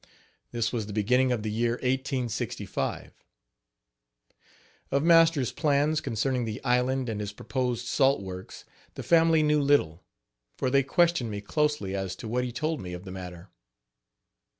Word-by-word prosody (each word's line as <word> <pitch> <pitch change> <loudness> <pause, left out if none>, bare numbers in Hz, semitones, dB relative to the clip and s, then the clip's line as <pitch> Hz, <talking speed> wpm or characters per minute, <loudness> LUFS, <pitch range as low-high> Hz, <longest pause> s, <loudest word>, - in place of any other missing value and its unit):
This 115 0 -1
was 110 -4 -2
the 105 - -7
beginning 125 +5 +2
of 115 -4 -1
the 110 - -2
year 115 +2 0
1865. 130 -1 -3 1.8
Of 140 +1 +1
master's 165 -6 +4
plans 150 0 +1
concerning 125 +2 -1
the 110 +1 -4
island 125 +1 +1
and 110 -2 -3
his 105 -1 -4
proposed 125 +2 -3
salt 135 +3 +2
works 95 -1 -9 0.3
the - - -6
family 165 -1 +4
knew 150 0 +3
little, 115 - +2 0.5
for 130 - -1
they 140 0 +4
questioned 165 -2 +2
me 105 -1 -4
closely 150 -4 -1
as 95 -1 -3
to - - -8
what 125 +3 -1
he 125 - -3
told 155 +6 -2
me 90 -1 -7
of 90 +1 -7
the 95 - -7
matter. 90 0 -9
125 Hz, 150 wpm, -27 LUFS, 105-140 Hz, 1.8 s, master's